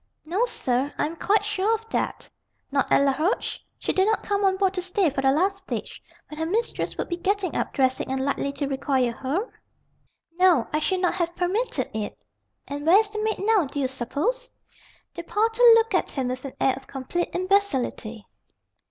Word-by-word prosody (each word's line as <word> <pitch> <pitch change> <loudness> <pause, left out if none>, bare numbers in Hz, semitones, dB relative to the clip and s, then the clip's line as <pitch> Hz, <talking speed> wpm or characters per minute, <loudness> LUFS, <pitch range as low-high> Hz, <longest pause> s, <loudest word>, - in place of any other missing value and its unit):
"No, 375 +9 +1
sir, 265 - -1
I - - +1
am 320 +3 -4
quite 410 +4 +1
sure 425 +1 +1
of 450 0 -9
that." - - -2 0.4
"Not 275 -1 0
at - - +5
Laroche? 305 - 0 0.2
She - - -2
did 380 +1 +3
not 440 - +1
come 405 -1 0
on 380 -1 +3
board 385 -1 +2
to 365 - -2
stay, 365 -2 +1
for 270 - -2
the 270 0 +4
last 380 +7 +1
stage, 380 - -6 0.3
when 300 - -9
her 320 - 0
mistress 455 +6 -2
would - - -2
be 345 - -3
getting 380 0 -1
up, - - -1
dressing, 260 -1 0
and 265 - -1
likely 280 0 -1
to 285 - -2
require 265 -2 0
her?" 280 - -2 0.9
"No; 355 -10 +5
I 305 - +2
should 370 +4 0
not 360 - +2
have 345 -1 -2
permitted 360 - -1
it." 215 -1 -5 0.4
"And 285 +1 -5
where 355 +4 +8
is 425 -1 +2
the 425 0 -3
maid 435 -2 -1
now, 430 -6 +4
d'you 275 0 -2
suppose?" 295 - -2 0.6
The 340 - -6
porter 445 +6 0
looked 455 0 +2
at - - +1
him 260 -3 -2
with 255 +2 -5
an 275 - -6
air 265 - +3
of 265 0 -12
complete 275 +6 -3
imbecility. 350 - 0
345 Hz, 195 wpm, -25 LUFS, 270-405 Hz, 0.9 s, where